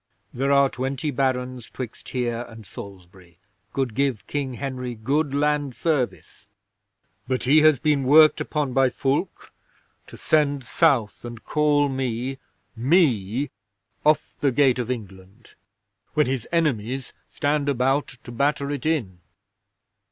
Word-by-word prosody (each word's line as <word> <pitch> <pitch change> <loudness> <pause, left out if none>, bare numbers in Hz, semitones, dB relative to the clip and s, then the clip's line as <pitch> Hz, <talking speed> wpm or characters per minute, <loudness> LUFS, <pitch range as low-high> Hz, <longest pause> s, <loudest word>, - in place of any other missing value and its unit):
"There 135 +3 0
are 140 0 +5
twenty 135 +3 -3
Barons 130 -2 -2
'twixt 125 -4 -8
here 120 -2 -2
and 110 -2 -12
Salisbury 90 -2 -12 0.3
could 130 -2 -2
give 135 -3 -1
King 135 -3 -3
Henry 125 -2 -4
good 140 +6 -1
land 145 -2 0
service, 150 -7 -2 0.8
but 130 -1 -1
he 145 +5 +5
has 155 -2 +6
been 150 -3 +1
worked 155 +3 +6
upon 145 -4 -2
by 135 0 +4
Fulke 135 +8 -2 0.6
to - - -12
send 145 -3 +1
South 125 -5 +1
and 120 -1 -8
call 150 -1 +2
me 130 0 -3 0.4
me! 125 - +2 0.5
off 155 0 +2
the 140 - +2
Gate 130 -1 +3
of 120 -1 -3
England, 100 -2 -8 0.6
when 150 - +4
his 130 -2 -3
enemies 135 -6 -1 0.2
stand 145 -1 0
about 135 +2 +1 0.2
to - - -9
batter 140 +3 0
it 145 0 -3
in. 115 - -1
135 Hz, 130 wpm, -24 LUFS, 120-145 Hz, 0.8 s, has